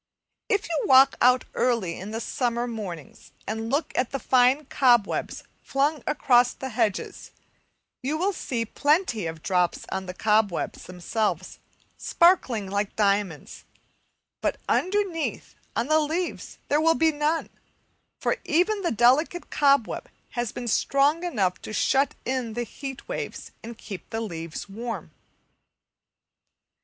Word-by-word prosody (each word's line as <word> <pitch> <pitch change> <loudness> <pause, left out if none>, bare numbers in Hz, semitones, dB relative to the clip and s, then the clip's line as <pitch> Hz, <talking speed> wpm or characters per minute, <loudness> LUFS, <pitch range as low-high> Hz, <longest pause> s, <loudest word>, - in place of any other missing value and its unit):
If 410 -3 +1
you 325 -3 -1
walk 265 0 +7
out 250 +1 +5
early 230 -9 0
in 190 - -7
the 220 +1 -4
summer 240 0 -1
mornings 200 - -8
and 225 +1 -3
look 285 +5 0
at 250 - +1
the 275 - -3
fine 260 +3 +3
cobwebs 240 -6 +2 0.2
flung 285 +2 0
across 245 -4 +3
the 265 - -6
hedges, 220 -4 -2 0.7
you 280 +4 -1
will 385 +5 0
see 240 -9 -3
plenty 290 - +1
of 160 -1 -7
drops 180 -2 0
on 190 -1 -3
the 180 - -6
cobwebs 210 -3 0
themselves 185 0 -3 0.4
sparkling 270 - +3
like 200 +1 -2
diamonds; 200 -6 -1 0.8
but - - -1
underneath 370 -4 -1 0.2
on 230 - +1
the 310 +3 +3
leaves 320 +4 -3
there 295 +2 +2
will 325 +1 +4
be 320 0 +3
none, 300 +2 -1 0.7
for - - 0
even 365 +6 +1
the 350 - 0
delicate 260 +10 +2
cobweb 280 -5 +2 0.2
has 240 -3 -2
been 245 - -6
strong 280 - +2
enough 200 - 0
to - - -7
shut 275 +5 +2
in 255 -3 -2
the 240 +2 -2
heat 270 +3 -8
waves - - -5
and 230 0 -9
keep 195 -6 -9
the 225 - -3
leaves 165 -4 -6
warm. 230 +4 -6
245 Hz, 135 wpm, -25 LUFS, 210-295 Hz, 0.8 s, walk